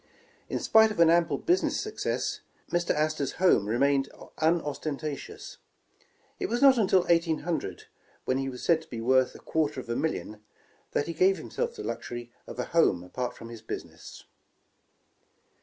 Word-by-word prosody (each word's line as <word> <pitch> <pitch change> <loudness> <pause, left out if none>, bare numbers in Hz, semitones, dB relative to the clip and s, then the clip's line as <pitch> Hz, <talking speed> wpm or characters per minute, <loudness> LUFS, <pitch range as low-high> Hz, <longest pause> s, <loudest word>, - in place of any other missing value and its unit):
In - - -1
spite 220 0 +5
of 210 - -6
an 165 -1 +7
ample 170 0 +3
business 355 +2 +1
success, 430 +1 -2 0.3
Mr. 175 0 0
Astor 155 -1 +1
's - - -3
home 180 - +3
remained 135 +4 +2 0.3
unostentatious. 155 -2 -2 0.8
It 380 - -1
was 240 - 0
not 270 -3 +6
until 190 -3 +4
1800, 165 - 0 0.4
when 130 +1 +1
he 135 0 -2
was 125 -1 -8
said 165 -2 +3
to - - -16
be 115 - -6
worth 130 +2 +2
a - - -10
quarter 150 -3 -1
of 125 - -9
a 115 - -1
million, 110 -9 -3 0.5
that 145 - +1
he 170 - -4
gave 190 +4 +3
liimself 475 0 -4
the - - -7
luxury 120 0 -5 0.2
of - - -8
a - - -2
home 95 - +3
apart 125 +7 -4
from 115 - -10
his 115 -2 -9
business. 110 - -8
155 Hz, 165 wpm, -28 LUFS, 130-175 Hz, 0.8 s, an